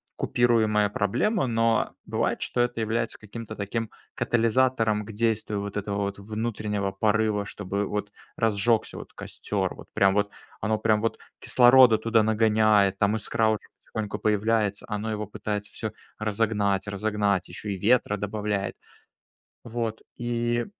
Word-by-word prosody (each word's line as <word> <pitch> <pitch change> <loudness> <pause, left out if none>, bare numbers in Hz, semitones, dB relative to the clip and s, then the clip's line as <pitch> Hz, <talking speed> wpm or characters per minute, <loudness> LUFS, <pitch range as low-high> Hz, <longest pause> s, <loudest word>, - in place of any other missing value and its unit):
купируемая 110 -4 +2
проблема. 135 - +1
Но 115 -1 +2 0.2
бывает, - - 0
что 120 - 0
это 120 -1 0
является 115 +1 -1
каким-то 110 +1 -8
таким 110 +2 -3 0.3
катализатором 115 -2 +2
к 110 - -8
действию 110 -1 0
вот 100 +1 -5
этого 100 0 -2
вот 100 0 -2
внутреннего 105 -1 -2
порыва, 105 +1 +1
чтобы 100 0 -3
вот 105 +1 -3 0.3
разжегся 110 +1 +1
вот - - -9
костер. - - -3
Вот - - -12
прям 95 -1 +4
вот 105 0 +1 0.3
оно 110 0 0
прям 110 -1 +2
вот 115 - -1 0.2
кислорода 125 -2 +6
туда 115 0 +3
нагоняет, 110 -2 +3
там 100 +2 +2
искра 110 +1 +1
уже 110 - -2 0.2
потихоньку 105 -1 -4
появляется. 105 0 +1
Оно 105 +1 -2
его 105 -1 -3
пытается 105 0 -4
всё - - -5 0.3
разогнать, 105 -2 0
разогнать, 100 -1 0
еще 105 - -6
и 95 - -5
ветра 120 -4 +3
добавляет. 105 0 -2 0.9
Вот 115 -1 -3 0.2
и 120 0 0
110 Hz, 140 wpm, -26 LUFS, 105-115 Hz, 0.9 s, кислорода